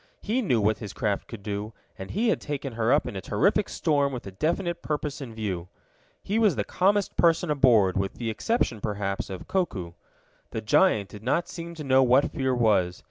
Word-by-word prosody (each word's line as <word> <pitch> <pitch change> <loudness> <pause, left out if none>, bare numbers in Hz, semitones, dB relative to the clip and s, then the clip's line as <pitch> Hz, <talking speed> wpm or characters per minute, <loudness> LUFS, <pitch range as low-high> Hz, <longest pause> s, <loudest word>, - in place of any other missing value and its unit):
He 235 +5 0
knew 130 - +2
what 105 0 +1
his 105 -4 -7
craft 105 -5 -2
could 110 -4 -9
do, 105 +1 -4 0.2
and 95 - -8
he 225 +4 +1
had - - +1
taken 140 -3 -4
her 115 +1 +1
up - - +3
in - - -6
a 95 - -4
terrific 205 - +1
storm 145 -4 +1
with 125 -2 -6
a 95 - -7
definite 170 - -1
purpose 150 -1 -3
in 130 -4 -6
view. 95 -6 -3 0.6
He 210 +3 0
was 215 -4 +4
the - - 0
calmest 200 +2 +1
person 170 -1 +3
aboard, 115 -10 +4
with 95 0 -1
the 115 -2 -3
exception, 120 - -1
perhaps, 100 -1 -3
of 95 -2 -7
Koku. 100 - -1 0.6
The - - -4
giant 100 -2 +3
did 105 - -11
not 135 +9 0
seem 170 0 -7
to 155 - -7
know 135 -1 +4
what 130 +2 +4
fear 130 -1 0
was. 100 -7 +2
125 Hz, 205 wpm, -26 LUFS, 105-170 Hz, 0.6 s, was